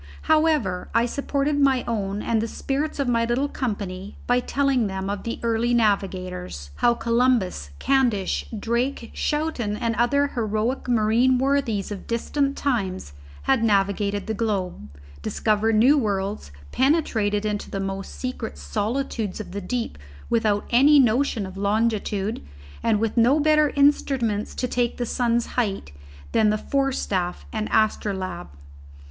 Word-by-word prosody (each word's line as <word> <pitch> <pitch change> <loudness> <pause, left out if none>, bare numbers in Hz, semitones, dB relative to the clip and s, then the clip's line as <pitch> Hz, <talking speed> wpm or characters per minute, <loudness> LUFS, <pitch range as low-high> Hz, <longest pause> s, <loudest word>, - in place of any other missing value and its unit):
However, 310 - +2
I 230 +1 +4
supported 280 +3 -1
my 270 -3 +3
own 205 -3 -2
and 225 -2 +1
the 225 - -2
spirits 280 +6 -3
of 280 -2 -1
my 230 -1 +2
little 240 +5 0
company 200 -7 -4
by 245 0 +3
telling 270 -3 +1
them 190 0 -3
of 200 - -4
the 230 - -4
early 235 +1 +1
navigators; 185 - -1
how 240 - +3
Columbus, 230 - +1
Candish, 240 -8 +1
Drake, 235 +2 -1
Schouten 295 -9 -1
and 230 -1 -1
other 280 +5 +2
heroic 225 +2 -2
marine 235 +3 +3
worthies 255 -7 0
of 200 - -7
distant 275 +4 -1
times 195 - -2 0.3
had 265 -4 +2
navigated 200 -1 +1
the 220 - -2
globe, 195 - -2 0.3
discovered 215 - +1
new 265 +7 +5
worlds, 200 - -2 0.2
penetrated 225 -8 +1
into 210 -1 -2
the 195 - -4
most 195 0 -4
secret 255 - -5
solitudes 215 - -2
of 215 - -7
the 200 +2 -4
deep 230 - -3 0.3
without 215 -3 +1
any 280 +5 +6
notion 245 -3 +2
of 190 0 -9
longitude 210 0 0 0.4
and 220 -2 +2
with 225 +2 -1
no 245 +6 +5
better 305 0 +4
instruments 265 -7 +1
to 250 - -1
take 245 -1 -1
the 245 - -1
sun's 235 0 +1
height 200 - -2 0.4
than 215 -1 +3
the 215 - +1
forestaff 210 -9 -1
and 215 -1 -2
astrolabe. 190 - 0
230 Hz, 140 wpm, -24 LUFS, 200-255 Hz, 0.4 s, any